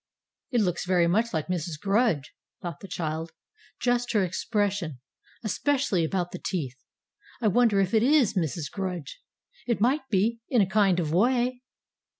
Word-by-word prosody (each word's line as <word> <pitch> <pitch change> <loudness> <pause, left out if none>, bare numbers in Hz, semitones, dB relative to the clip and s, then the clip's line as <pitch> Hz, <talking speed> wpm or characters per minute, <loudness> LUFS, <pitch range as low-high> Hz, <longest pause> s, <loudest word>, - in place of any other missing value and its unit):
"It 245 -4 +2
looks 180 -3 -1
very 180 -2 +4
much 220 +7 +2
like 160 -3 -1
Mrs. 170 -3 -3
Grudge!" 195 - +1 0.3
thought 170 -4 -6
the 195 - -9
child. 160 -2 -4 0.5
"Just 245 -1 +1
her 210 -3 +3
expression 190 - -1 0.4
especially 255 - +1
about 175 +2 -1
the 180 - -7
teeth! 140 -9 -3 0.6
I 230 - +1
wonder 225 -1 +3
if 195 +1 +1
it 220 - +5
IS 270 -2 +4
Mrs. 165 -4 -2
Grudge! 185 - -5 0.5
It 235 - +1
might 265 +5 +1
be, 225 +3 +1
in 245 - +3
a 200 - +5
kind 190 -2 +3
of 155 -3 -1
way." 245 +5 +2
195 Hz, 155 wpm, -27 LUFS, 175-235 Hz, 0.6 s, it